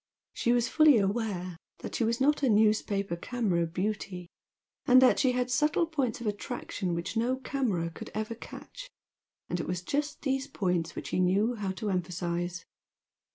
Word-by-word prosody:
She 235 Hz, -, +1 dB
was 240 Hz, -1 st, +3 dB
fully 310 Hz, -5 st, +6 dB
aware 195 Hz, -4 st, -1 dB, 0.2 s
that -, -, -6 dB
she -, -, 0 dB
was 230 Hz, +1 st, +1 dB
not 290 Hz, +3 st, +3 dB
a 270 Hz, -, +3 dB
newspaper 210 Hz, -3 st, +2 dB
camera 180 Hz, -4 st, -1 dB
"beauty" 180 Hz, 0 st, -3 dB, 0.6 s
and 255 Hz, 0 st, +8 dB
that 260 Hz, -1 st, +5 dB
she 260 Hz, -2 st, +3 dB
had 250 Hz, 0 st, -1 dB
subtle 300 Hz, +5 st, +2 dB
points 275 Hz, -9 st, -1 dB
of 235 Hz, -, -7 dB
attraction 205 Hz, -4 st, -3 dB
which 170 Hz, +6 st, -4 dB
no 240 Hz, +3 st, +1 dB
camera 240 Hz, -11 st, -1 dB
could -, -, -9 dB
ever 215 Hz, +1 st, -2 dB
catch, -, -, -10 dB, 0.6 s
and 175 Hz, -, -2 dB
it -, -, -3 dB
was 180 Hz, 0 st, -3 dB
just 290 Hz, +7 st, -2 dB
these 270 Hz, -1 st, 0 dB
points 180 Hz, -, -1 dB
which -, -, -6 dB
she -, -, 0 dB
knew 195 Hz, +6 st, +3 dB
how 205 Hz, -4 st, -3 dB
to 210 Hz, +1 st, -3 dB
emphasise. 175 Hz, -1 st, -2 dB
215 Hz, 170 wpm, -29 LUFS, 180-255 Hz, 0.6 s, and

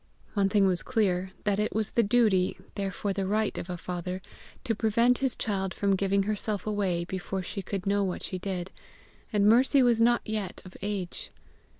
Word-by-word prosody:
One 200 Hz, -2 st, +2 dB
thing 200 Hz, -1 st, +4 dB
was 185 Hz, -2 st, +2 dB
clear, 190 Hz, -7 st, 0 dB
that 205 Hz, -1 st, +1 dB
it 210 Hz, -, -1 dB
was 215 Hz, -1 st, 0 dB
the 235 Hz, -, +3 dB
duty, 205 Hz, -4 st, +3 dB, 0.2 s
therefore 195 Hz, 0 st, -2 dB
the 195 Hz, -1 st, -2 dB
right 215 Hz, +1 st, +1 dB
of 175 Hz, -, -5 dB
a 180 Hz, -, -3 dB
father, 180 Hz, +1 st, -4 dB, 0.4 s
to 240 Hz, -4 st, 0 dB
prevent 230 Hz, +3 st, +3 dB
his 265 Hz, -2 st, +1 dB
child 195 Hz, -3 st, -2 dB
from 200 Hz, -1 st, +2 dB
giving 195 Hz, +1 st, +1 dB
herself 210 Hz, -1 st, -2 dB
away 195 Hz, -5 st, 0 dB
before 190 Hz, +1 st, -4 dB
she 195 Hz, -, -5 dB
could 195 Hz, 0 st, -4 dB
know 200 Hz, 0 st, +2 dB
what 185 Hz, -2 st, -3 dB
she 185 Hz, -, -4 dB
did; 185 Hz, -1 st, -4 dB, 0.6 s
and 205 Hz, -2 st, +3 dB
Mercy 255 Hz, +4 st, +5 dB
was 235 Hz, -2 st, +3 dB
not 240 Hz, +1 st, +4 dB
yet 210 Hz, -4 st, -3 dB
of 185 Hz, -, -12 dB
age. 195 Hz, -3 st, -4 dB
200 Hz, 190 wpm, -28 LUFS, 190-215 Hz, 0.6 s, Mercy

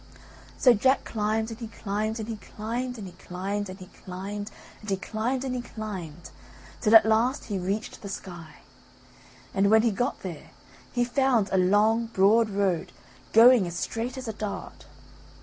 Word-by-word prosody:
So 250 Hz, -, +6 dB
Jack 260 Hz, +5 st, +2 dB
climbed 220 Hz, +1 st, -1 dB
and 225 Hz, -, -8 dB
he 230 Hz, -, -5 dB
climbed 215 Hz, +1 st, -3 dB
and 220 Hz, -, -5 dB
he 225 Hz, -2 st, -4 dB
climbed 240 Hz, +4 st, -5 dB
and 210 Hz, -, -7 dB
he 180 Hz, -, -9 dB
climbed 195 Hz, +3 st, -3 dB
and 185 Hz, -, -8 dB
he 185 Hz, -, -9 dB
climbed 195 Hz, +3 st, -7 dB, 0.3 s
and 215 Hz, -, -8 dB
he 195 Hz, -, +1 dB
climbed 235 Hz, +6 st, -2 dB
and 260 Hz, -2 st, -2 dB
he 250 Hz, -, -2 dB
climbed 190 Hz, -9 st, -7 dB, 0.5 s
till 220 Hz, 0 st, +4 dB
at 220 Hz, -1 st, +9 dB
last 225 Hz, +4 st, +2 dB
he 200 Hz, -3 st, -3 dB
reached 195 Hz, +5 st, -3 dB
the 200 Hz, -, -7 dB
sky. 175 Hz, -4 st, -9 dB, 0.9 s
And 195 Hz, +1 st, +3 dB
when 220 Hz, +1 st, +6 dB
he 235 Hz, -, +3 dB
got 245 Hz, +6 st, -2 dB
there 170 Hz, -6 st, -7 dB, 0.4 s
he 245 Hz, -, +1 dB
found 245 Hz, -4 st, +2 dB
a 190 Hz, -, +3 dB
long 215 Hz, +5 st, +3 dB
broad 220 Hz, +1 st, +4 dB
road 195 Hz, -4 st, -1 dB, 0.4 s
going 230 Hz, -3 st, +7 dB
as 175 Hz, 0 st, -5 dB
straight 235 Hz, +6 st, -3 dB
as 260 Hz, -2 st, -6 dB
a 220 Hz, -, -3 dB
dart. 210 Hz, -8 st, -6 dB
215 Hz, 175 wpm, -27 LUFS, 195-230 Hz, 0.9 s, at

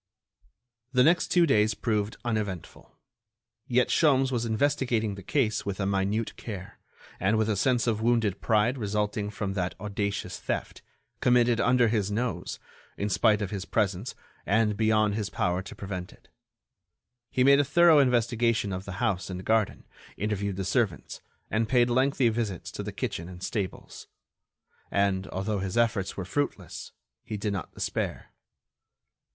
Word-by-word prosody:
The 125 Hz, -1 st, +5 dB
next 170 Hz, +5 st, +4 dB
two 175 Hz, -1 st, +4 dB
days 110 Hz, -7 st, +3 dB
proved 105 Hz, -2 st, -1 dB
uneventful. 105 Hz, -6 st, -4 dB, 0.7 s
Yet 125 Hz, +1 st, +2 dB
Sholmes 135 Hz, -4 st, +3 dB
was 120 Hz, -2 st, 0 dB
investigating 115 Hz, -3 st, +1 dB
the 100 Hz, -, -9 dB
case 110 Hz, +1 st, 0 dB
with 100 Hz, -1 st, -4 dB
a 100 Hz, -, 0 dB
minute 100 Hz, +3 st, 0 dB
care, 100 Hz, -5 st, -8 dB, 0.4 s
and 100 Hz, +3 st, +2 dB
with 110 Hz, -1 st, +1 dB
a 110 Hz, -, +1 dB
sense 120 Hz, +4 st, +2 dB
of 110 Hz, -2 st, 0 dB
wounded 115 Hz, -4 st, +1 dB
pride 115 Hz, +4 st, +2 dB
resulting 105 Hz, -1 st, -1 dB
from 100 Hz, -1 st, -3 dB
that 95 Hz, -2 st, -2 dB
audacious 100 Hz, -3 st, -3 dB
theft, -, -, -4 dB, 0.4 s
committed 120 Hz, -1 st, +3 dB
under 125 Hz, -1 st, +4 dB
his 105 Hz, -3 st, 0 dB
nose, 110 Hz, -3 st, -2 dB, 0.4 s
in 100 Hz, -, -1 dB
spite 105 Hz, 0 st, +3 dB
of 95 Hz, -, -4 dB
his 100 Hz, -3 st, -3 dB
presence 100 Hz, +1 st, -1 dB, 0.3 s
and 105 Hz, +1 st, +2 dB
beyond 110 Hz, -1 st, +2 dB
his 105 Hz, -1 st, -2 dB
power 90 Hz, -1 st, 0 dB
to 95 Hz, -, -10 dB
prevent 95 Hz, -2 st, -6 dB
it. -, -, -21 dB, 1.0 s
He 125 Hz, -, +1 dB
made 140 Hz, +1 st, +6 dB
a -, -, +5 dB
thorough 160 Hz, +3 st, +6 dB
investigation 120 Hz, -5 st, +2 dB
of 95 Hz, +1 st, -5 dB
the 100 Hz, -, -6 dB
house 95 Hz, -1 st, 0 dB
and 95 Hz, 0 st, -6 dB
garden, 110 Hz, -2 st, +1 dB, 0.3 s
interviewed 100 Hz, -1 st, -2 dB
the 95 Hz, 0 st, -3 dB
servants, 100 Hz, -2 st, -1 dB, 0.3 s
and 110 Hz, +1 st, 0 dB
paid 120 Hz, -1 st, +3 dB
lengthy 130 Hz, 0 st, +3 dB
visits 110 Hz, -6 st, -3 dB
to -, -, -5 dB
the -, -, -5 dB
kitchen 85 Hz, +2 st, -4 dB
and 90 Hz, 0 st, -10 dB
stables. 100 Hz, -5 st, -5 dB, 0.8 s
And, 100 Hz, -1 st, +1 dB
although 100 Hz, +2 st, -2 dB
his 95 Hz, +3 st, -3 dB
efforts 115 Hz, -5 st, +1 dB
were 95 Hz, -, -3 dB
fruitless, 145 Hz, +10 st, -3 dB, 0.3 s
he 105 Hz, -, -5 dB
did 105 Hz, 0 st, -2 dB
not 95 Hz, -, -5 dB
despair. -, -, -3 dB
105 Hz, 155 wpm, -27 LUFS, 100-120 Hz, 1.0 s, made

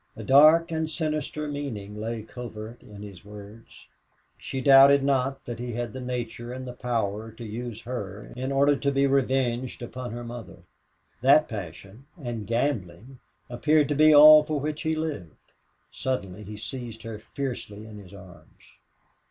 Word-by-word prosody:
A 110 Hz, -, -7 dB
dark 155 Hz, -, +6 dB
and 160 Hz, -1 st, -1 dB
sinister 155 Hz, -1 st, -3 dB
meaning 125 Hz, -9 st, -5 dB
lay 110 Hz, +1 st, -4 dB
covert 115 Hz, 0 st, -9 dB
in 105 Hz, -1 st, -12 dB
his 100 Hz, -3 st, -11 dB
words. 105 Hz, +2 st, -13 dB, 0.5 s
She 135 Hz, -, -5 dB
doubted 135 Hz, +1 st, +7 dB
not 135 Hz, 0 st, 0 dB
that 120 Hz, -2 st, -6 dB
he 120 Hz, -1 st, -5 dB
had 120 Hz, +1 st, -4 dB
the 130 Hz, -, -6 dB
nature 120 Hz, -1 st, -5 dB
and 130 Hz, +1 st, -6 dB
the 125 Hz, -, -6 dB
power 115 Hz, -3 st, -3 dB
to 115 Hz, +1 st, -9 dB
use 115 Hz, +1 st, -6 dB
her 105 Hz, -5 st, -7 dB
in 130 Hz, +2 st, -3 dB
order 140 Hz, +1 st, +3 dB
to 140 Hz, 0 st, -1 dB
be 140 Hz, 0 st, +2 dB
revenged 130 Hz, -3 st, 0 dB
upon 125 Hz, +1 st, -6 dB
her 120 Hz, +2 st, -6 dB
mother. 120 Hz, -1 st, -9 dB, 0.6 s
That 140 Hz, +4 st, +5 dB
passion 100 Hz, -, -9 dB
and 120 Hz, -7 st, -5 dB
gambling 115 Hz, -1 st, -2 dB, 0.3 s
appeared 150 Hz, +5 st, +2 dB
to 145 Hz, -, 0 dB
be 155 Hz, +2 st, +6 dB
all 150 Hz, +1 st, +9 dB
for 150 Hz, -1 st, -2 dB
which 150 Hz, +1 st, -3 dB
he 160 Hz, -1 st, 0 dB
lived. 150 Hz, -, -4 dB, 0.6 s
Suddenly 105 Hz, -6 st, -4 dB
he 105 Hz, +2 st, -8 dB
seized 115 Hz, -1 st, -7 dB
her 115 Hz, -2 st, -7 dB
fiercely 115 Hz, -3 st, -6 dB
in 105 Hz, -1 st, -10 dB
his 95 Hz, -3 st, -14 dB
arms. 95 Hz, -3 st, -15 dB
125 Hz, 160 wpm, -26 LUFS, 110-140 Hz, 0.6 s, all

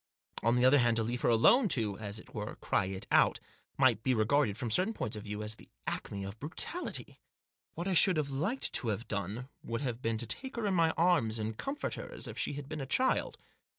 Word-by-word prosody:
On 115 Hz, +2 st, +3 dB
the 125 Hz, 0 st, +3 dB
other 135 Hz, +2 st, +6 dB
hand, 120 Hz, -2 st, +3 dB
to 115 Hz, -, +1 dB
leave 120 Hz, +2 st, -3 dB
her -, -, +2 dB
alone 210 Hz, -, +5 dB
to, 105 Hz, -4 st, -1 dB
as 105 Hz, -1 st, -5 dB
it -, -, -12 dB
were, 105 Hz, -2 st, -5 dB
cry 100 Hz, -, 0 dB
it 95 Hz, 0 st, -5 dB
out, -, -, +4 dB, 0.4 s
might 130 Hz, -5 st, +4 dB
be 130 Hz, +2 st, +2 dB
regarded, 110 Hz, -1 st, +2 dB
from 115 Hz, -1 st, -3 dB
certain 190 Hz, -, +2 dB
points 110 Hz, -, -2 dB
of 105 Hz, 0 st, -7 dB
view, 105 Hz, 0 st, -4 dB
as 105 Hz, +1 st, -2 dB
the -, -, -15 dB, 0.2 s
acme 100 Hz, -1 st, -4 dB
of 100 Hz, +3 st, -7 dB
brutality. 170 Hz, -, -2 dB, 0.6 s
What 170 Hz, +3 st, -3 dB
I 190 Hz, -, +1 dB
should 180 Hz, 0 st, +5 dB
have 145 Hz, -2 st, -1 dB
liked 190 Hz, -, -1 dB
to 125 Hz, -, +1 dB
have 110 Hz, +2 st, -2 dB
done 105 Hz, +5 st, -3 dB
would 115 Hz, +2 st, -4 dB
have 125 Hz, -3 st, -3 dB
been 115 Hz, -2 st, 0 dB
to 120 Hz, -, 0 dB
take 265 Hz, -, -2 dB
her 235 Hz, -2 st, -2 dB
in 200 Hz, -, +1 dB
my 165 Hz, -2 st, +4 dB
arms, 160 Hz, -11 st, +3 dB
and 110 Hz, 0 st, -3 dB
comfort 280 Hz, -, -3 dB
her -, -, -7 dB
as -, -, -5 dB
if -, -, -7 dB
she -, -, -1 dB
had 140 Hz, -1 st, -6 dB
been 155 Hz, 0 st, -5 dB
a 135 Hz, -, -5 dB
child. 255 Hz, -, +1 dB
120 Hz, 240 wpm, -32 LUFS, 110-155 Hz, 0.6 s, other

